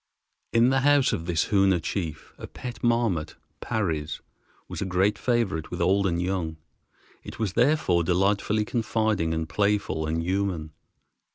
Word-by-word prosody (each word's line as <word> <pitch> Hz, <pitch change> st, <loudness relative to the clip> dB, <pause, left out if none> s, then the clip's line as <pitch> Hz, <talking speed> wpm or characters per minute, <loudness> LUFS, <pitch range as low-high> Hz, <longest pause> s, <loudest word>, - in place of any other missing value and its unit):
In 115 Hz, +2 st, +4 dB
the 135 Hz, -, +3 dB
house 145 Hz, 0 st, +4 dB
of 80 Hz, -, -3 dB
this 85 Hz, -3 st, 0 dB
Hoona 95 Hz, -3 st, +3 dB
chief 85 Hz, -2 st, -5 dB
a -, -, -7 dB
pet 125 Hz, -1 st, -8 dB
marmot 115 Hz, -9 st, +1 dB, 0.3 s
(Parry's) 80 Hz, -8 st, -2 dB, 0.5 s
was -, -, -6 dB
a -, -, -1 dB
great 95 Hz, +3 st, +2 dB
favorite 100 Hz, -6 st, -1 dB
with -, -, -5 dB
old 100 Hz, +1 st, +2 dB
and 85 Hz, -2 st, -1 dB
young. 90 Hz, -3 st, -2 dB, 0.7 s
It -, -, -9 dB
was 105 Hz, -5 st, -2 dB
therefore 125 Hz, -, +2 dB
delightfully 100 Hz, +4 st, +1 dB
confiding 110 Hz, -7 st, 0 dB
and 80 Hz, 0 st, -2 dB
playful 100 Hz, -6 st, 0 dB
and 80 Hz, +1 st, -1 dB
human. 90 Hz, -4 st, -2 dB
95 Hz, 150 wpm, -26 LUFS, 85-110 Hz, 0.7 s, In